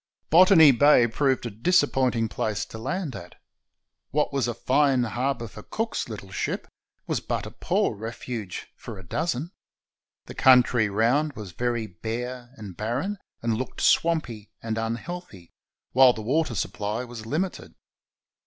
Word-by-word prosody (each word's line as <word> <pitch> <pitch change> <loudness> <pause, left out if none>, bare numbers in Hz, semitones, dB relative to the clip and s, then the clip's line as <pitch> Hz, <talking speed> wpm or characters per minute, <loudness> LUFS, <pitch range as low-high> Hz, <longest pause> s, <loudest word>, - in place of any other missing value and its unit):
Botany 165 -3 +8
Bay 135 -1 +5
proved 130 +2 0
a 120 - -4
disappointing 130 - +2
place 105 -1 -2
to 110 - -10
land 170 +3 -3
at. 85 +1 -10 0.7
What 150 0 0
was 135 -3 +1
a 120 - -3
fine 135 0 +2
harbor 120 +1 -2
for 105 +1 -11
Cook's 225 - -3
little 100 -3 -8
ship 100 - -3 0.4
was - - -1
but - - -3
a - - -8
poor - - 0
refuge 110 -2 -6
for 115 -4 -9
a 95 - -10
dozen. 160 - -2 0.7
The - - -9
country 125 -4 +5
round 125 +9 +1
was 105 -6 -8
very 120 +3 -1
bare 120 +6 -6
and 100 -5 -9
barren, 130 - -2 0.2
and 115 -1 +1
looked 130 +3 -5
swampy 130 -11 +1
and 110 -1 -3
unhealthy, 115 - -6 0.4
while 130 -1 +7
the 110 - -7
water 140 +2 0
supply 105 +4 -3
was 120 -3 -9
limited. 175 +9 -3
120 Hz, 145 wpm, -25 LUFS, 110-145 Hz, 0.7 s, Botany